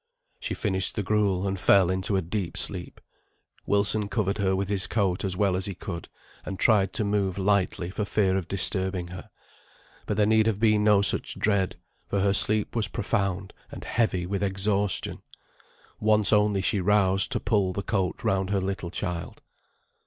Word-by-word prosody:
She - - -4
finished 95 -3 +1
the 105 - -2
gruel, 100 -2 0
and 95 0 -3
fell 95 -1 +4
into 95 +2 0
a 95 - -1
deep 90 0 -4
sleep. - - -1 0.7
Wilson 100 +1 +1
covered 100 0 -1
her 95 -1 +1
with 95 0 -2
his 100 -1 0
coat 95 -5 -1
as 95 -2 -2
well 100 -2 +1
as 95 0 0
he 100 - -5
could, 85 -3 -7 0.3
and 95 - -6
tried 100 -3 +3
to 110 - -1
move 100 -2 -1
lightly 95 -3 0
for 105 - -3
fear 100 -2 +1
of 95 -3 -2
disturbing 95 -2 0
her; 90 0 -10 0.8
but 105 - -2
there 105 - +3
need 110 +1 +3
have 105 -3 0
been 110 -2 +3
no 105 -1 +4
such 95 - 0
dread, 100 -3 0 0.3
for 100 - -1
her 100 0 +2
sleep 105 +2 +2
was 115 -2 +1
profound 100 -2 -2 0.2
and - - -9
heavy 100 -7 0
with 100 +2 -3
exhaustion. 100 0 0 0.8
Once 105 0 +2
only 105 -2 +2
she 100 - +2
roused 95 +1 +2
to 120 - -1
pull 105 -4 0
the 100 +2 -4
coat 95 -4 -2
round 95 -1 0
her 100 -1 +1
little 95 -2 -4
child. 85 -1 -5
100 Hz, 180 wpm, -26 LUFS, 95-105 Hz, 0.8 s, fell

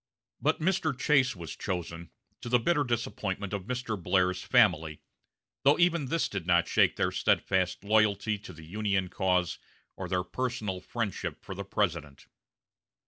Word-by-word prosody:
But 155 +5 +1
Mr. 160 -4 0
Chase 130 -4 +3
was 85 -4 -7
chosen, 85 -2 -5 0.3
to 120 - -6
the 125 - +5
bitter 145 +5 +2
disappointment 105 -5 -3
of 100 -2 -3
Mr. 120 -4 -3
Blair's 90 +1 +1
family, 85 - +3 0.6
though 140 +2 +5
even 170 -5 +2
this 165 +4 0
did 95 -4 -5
not 85 -1 +4
shake - - +3
their - - 0
steadfast 95 -1 +1
loyalty 105 0 +2
to 105 -2 -10
the 80 -2 -12
Union 100 0 -1
cause 90 -3 0 0.4
or - - -6
their 90 -1 0
personal 110 -3 -3
friendship 105 +1 -4
for - - -6
the 100 +1 -6
President. 80 -8 -2
100 Hz, 150 wpm, -29 LUFS, 90-125 Hz, 0.6 s, the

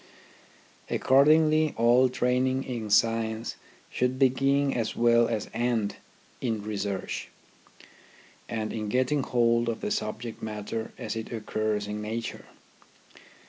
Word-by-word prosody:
Accordingly, 155 +3 +4
all 120 +3 +5
training 130 +1 +1
in 115 -5 -5
science 115 +1 +1 0.4
should 125 +1 0
begin 135 +1 +2
as 115 -3 -2
well 120 0 +4
as 110 -3 -2
end 115 -3 0 0.4
in 110 -4 -2
research, 100 -2 -4 1.2
and 110 -1 -3
in 110 -2 -3
getting 130 +5 +1
hold 120 -2 +2
of 115 - -4
the 210 - -2
subject 115 - -4
matter 110 +1 -4
as - - -4
it 110 0 -5
occurs 110 -2 -2
in 105 +1 -4
nature. 115 +2 -5
115 Hz, 115 wpm, -27 LUFS, 110-130 Hz, 1.2 s, all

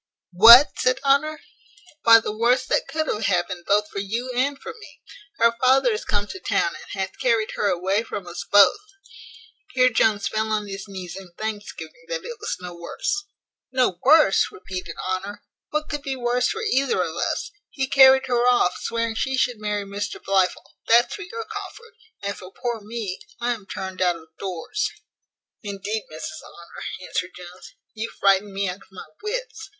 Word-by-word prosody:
What?" 235 +9 +10
said 255 +1 +2
Honour: 285 +2 +2 0.6
"Why, 230 0 +8
the 215 -1 -5
worst 240 +4 +2
that - - +1
could 315 0 -2
have 215 -7 -2
happened 175 -2 -1
both 210 +1 +3
for 200 - -6
you 230 +6 -3
and 275 +3 0
for - - -8
me. 445 -1 -15 0.4
Her 230 0 +3
father 260 -1 +5
is 215 - -3
come 205 0 0
to 380 - -8
town, - - 0
and 200 - -9
hath 190 - -4
carried 230 -4 +1
her 205 - -1
away 190 +3 +1
from 205 -4 -6
us 175 0 -6
both." 205 - +7 1.0
Here 255 0 +5
Jones 210 -4 +2
fell 220 +3 -2
on 215 -1 0
his 195 +1 -7
knees 185 -3 -7
in 190 -3 -11
thanksgiving 220 - -6
that - - -4
it 475 -2 -7
was 445 - -3
no 180 -1 -8
worse. 400 - -3 0.5
"No 250 -9 +1
worse!" 305 +3 +5
repeated 185 - -7
Honour; 195 +2 -4 0.3
"what 305 0 -2
could 295 -1 -4
be 275 -2 -3
worse 245 0 +1
for 450 +2 -3
either 425 - +1
of - - -5
us? - - -2 0.2
He 270 - -2
carried 265 0 +6
her 245 -1 +1
off, 245 -8 +3
swearing 230 -1 -1
she 265 +4 -1
should 245 -3 0
marry 210 -1 -2
Mr 200 +1 -5
Blifil; 190 -2 -1
that's 235 +2 +4
for 415 - -7
your 450 +5 -6
comfort; 445 +2 -9 0.3
and, 200 0 -2
for 185 0 -11
poor 235 0 -4
me, 210 -3 -5 0.2
I 240 +1 0
am 210 -4 -11
turned 190 -1 -6
out 180 -1 +3
of 160 -1 -14
doors." 195 - -3 0.7
"Indeed, 205 +1 -4
Mrs 155 0 -7
Honour," 170 0 -11 0.2
answered 185 -1 -3
Jones, 180 0 -12 0.2
"you 225 +1 -4
frightened 195 0 +3
me 200 0 0
out 180 0 -4
of - - -25
my 190 -1 -10 0.2
wits. 435 -1 -5
220 Hz, 185 wpm, -23 LUFS, 195-265 Hz, 1.0 s, What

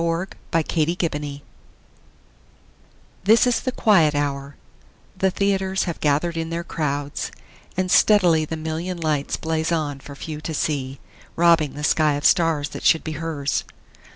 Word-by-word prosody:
Sara 170 +2 0 0.4
Teasdale 160 +2 0
Broadway 145 -1 -6 1.8
THIS 225 +5 +6
is 245 -1 +2
the 255 - -2
quiet 170 -12 +3
hour; 140 -1 -2 0.6
the 190 0 +2
theaters 190 0 0
Have 170 -3 -4
gathered 150 +3 +1
in 165 0 -3
their 170 +1 -3
crowds, 145 -3 -3 0.5
and 185 -1 0
steadily 180 -7 +5
The 160 +1 -4
million 160 +3 -4
lights 155 -4 -1
blaze 160 +1 -1
on 150 -4 -1
for 140 +1 -11
few 155 +1 -7
to 160 0 -4
see, 135 -3 -2 0.4
Robbing 165 -4 +4
the 150 - -6
sky 150 0 +3
of 145 - -4
stars 160 -4 +3
that - - -8
should 160 - +4
be 160 - -4
hers. 150 -4 -2
160 Hz, 150 wpm, -22 LUFS, 145-170 Hz, 1.8 s, THIS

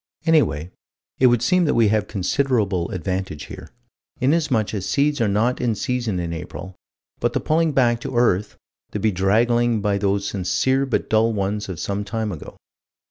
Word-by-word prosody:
Anyway, 90 - +2 0.5
it 130 - +6
would 120 -1 +3
seem 180 +7 +3
that 150 - +1
we 115 -3 +4
have 105 -1 +1
considerable 100 -3 0
advantage 95 -4 -3
here, - - -10 0.5
inasmuch 135 -6 +1
as 100 -4 -3
seeds 145 -1 +1
are 115 - +3
not 110 +5 +1
in 120 -3 +1
season 120 -4 -2
in 85 -1 -3
April 90 +3 -7 0.4
but - - 0
the - - +1
pulling 160 +1 +1
back 120 -4 +2
to 125 - -5
earth, 105 -4 +1 0.4
the 105 - -2
bedraggling 110 +4 +2
by 100 -1 0
those 100 0 0
sincere 130 +9 0
but 130 - -1
dull 110 +1 +2
ones 105 0 -2
of 90 -4 -5
some 100 +1 -2
time 110 0 -3
ago. 85 - -9
110 Hz, 170 wpm, -22 LUFS, 95-125 Hz, 0.5 s, it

